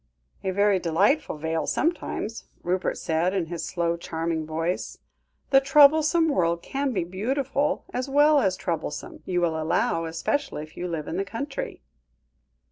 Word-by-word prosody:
"A 190 Hz, -, -1 dB
very 200 Hz, 0 st, +3 dB
delightful 185 Hz, -, +1 dB
vale 160 Hz, +1 st, -2 dB
sometimes," 310 Hz, -9 st, -2 dB, 0.2 s
Rupert 185 Hz, +2 st, -1 dB
said, 170 Hz, +4 st, 0 dB
in 185 Hz, -4 st, 0 dB
his 170 Hz, 0 st, -5 dB
slow, 170 Hz, -1 st, -1 dB
charming 165 Hz, -1 st, -3 dB
voice; 165 Hz, +3 st, -2 dB, 0.5 s
"the 270 Hz, -1 st, +7 dB
troublesome 305 Hz, +4 st, +5 dB
world 170 Hz, -, +1 dB
can 275 Hz, 0 st, -1 dB
be 190 Hz, -7 st, 0 dB
beautiful, 270 Hz, +10 st, -1 dB
as 255 Hz, +2 st, -2 dB
well 290 Hz, +2 st, +5 dB
as 185 Hz, -4 st, +1 dB
troublesome, 165 Hz, -4 st, -4 dB
you 180 Hz, -1 st, 0 dB
will 160 Hz, -2 st, 0 dB
allow, 165 Hz, +1 st, +1 dB
especially 165 Hz, -, -2 dB
if 155 Hz, +1 st, -14 dB
you 180 Hz, -, -4 dB
live 165 Hz, -3 st, -4 dB
in 170 Hz, -, -3 dB
the 195 Hz, -, +1 dB
country." 275 Hz, +7 st, -5 dB
185 Hz, 150 wpm, -25 LUFS, 165-275 Hz, 0.5 s, the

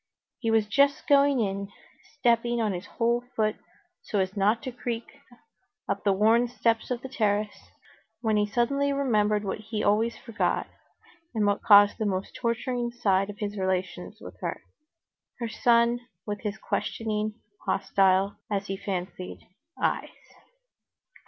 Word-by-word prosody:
He 225 Hz, -, -1 dB
was 225 Hz, -1 st, +3 dB
just 280 Hz, +6 st, +2 dB
going 280 Hz, -2 st, +5 dB
in, 200 Hz, -1 st, -2 dB, 0.5 s
stepping 240 Hz, -2 st, +2 dB
on 215 Hz, -3 st, +1 dB
his 180 Hz, +2 st, -6 dB
whole 235 Hz, 0 st, +1 dB
foot 215 Hz, -1 st, +1 dB, 0.4 s
so 210 Hz, -, -3 dB
as 190 Hz, +1 st, 0 dB
not 210 Hz, +3 st, +2 dB
to 260 Hz, -, -4 dB
creak, 240 Hz, -1 st, -4 dB, 0.8 s
up 200 Hz, -, -2 dB
the 200 Hz, -, +3 dB
worn 220 Hz, +5 st, +4 dB
steps 230 Hz, -2 st, 0 dB
of 245 Hz, -1 st, -3 dB
the -, -, -4 dB
terrace, 210 Hz, -5 st, -1 dB, 0.5 s
when 220 Hz, -2 st, +1 dB
he 210 Hz, 0 st, +2 dB
suddenly 275 Hz, +6 st, +1 dB
remembered 215 Hz, -7 st, +1 dB
what 195 Hz, +1 st, -3 dB
he 215 Hz, 0 st, -4 dB
always 220 Hz, +3 st, +2 dB
forgot, 230 Hz, -3 st, -1 dB, 0.7 s
and 215 Hz, -2 st, +2 dB
what 205 Hz, 0 st, +1 dB
caused 205 Hz, -1 st, +7 dB
the 215 Hz, -, 0 dB
most 190 Hz, -1 st, -2 dB
torturing 240 Hz, +1 st, -1 dB
side 200 Hz, -4 st, +1 dB
of 205 Hz, -, -7 dB
his 205 Hz, -2 st, -4 dB
relations 185 Hz, +1 st, -2 dB
with -, -, -10 dB
her, -, -, -4 dB, 0.7 s
her 235 Hz, -, -3 dB
son 235 Hz, +1 st, +3 dB, 0.3 s
with 205 Hz, -1 st, -3 dB
his 210 Hz, -1 st, -3 dB
questioning—hostile, 205 Hz, -3 st, 0 dB
as 200 Hz, -1 st, -1 dB
he 195 Hz, -1 st, -4 dB
fancied—eyes. 185 Hz, -, -4 dB
215 Hz, 140 wpm, -27 LUFS, 200-235 Hz, 0.8 s, caused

